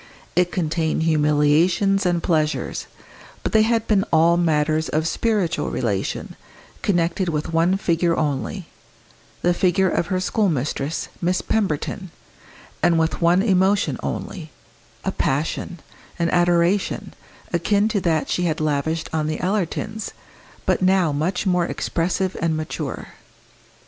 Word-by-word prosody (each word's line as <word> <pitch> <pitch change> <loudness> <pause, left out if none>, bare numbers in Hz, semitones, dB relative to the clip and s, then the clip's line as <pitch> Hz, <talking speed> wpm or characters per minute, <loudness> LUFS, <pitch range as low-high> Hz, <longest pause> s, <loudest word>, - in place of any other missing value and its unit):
It 175 0 +2
contained 160 -2 0
humiliations 160 +6 +3
and 175 -1 0
pleasures, 155 -3 -1 0.6
but - - -1
they 220 - +5
had 225 0 +2
been 200 -3 +2
all 165 +1 +5
matters 155 -2 +1
of 155 +1 0
spiritual 195 -5 0
relation, - - -2 0.5
connected 175 -1 +1
with 155 +1 -3
one 170 +4 +3
figure 170 -2 +1
only 155 +5 -2 0.8
the 175 - +3
figure 185 +1 +2
of 170 - 0
her 185 -1 0
schoolmistress, 160 - -1
Miss 180 +1 0
Pemberton; 190 -1 -1 0.7
and 170 - +3
with 160 +1 0
one 175 +3 +4
emotion 195 -1 +2
only 165 -5 -5 0.6
a - - +1
passion, 160 +5 -2 0.4
an 170 -1 0
adoration, 175 +2 +1 0.4
akin 200 +5 +2
to 210 -3 0
that 160 -3 +1
she 180 - 0
had 160 -2 -1
lavished 155 +1 -1
on 155 -1 0
the 155 - -2
Ellertons, 210 +3 -2 0.5
but - - +1
now 185 -3 +3
much 165 +8 -1
more 180 -2 +2
expressive 185 +2 -1
and 165 -1 +1
mature. 155 0 -5
170 Hz, 130 wpm, -22 LUFS, 160-190 Hz, 0.8 s, they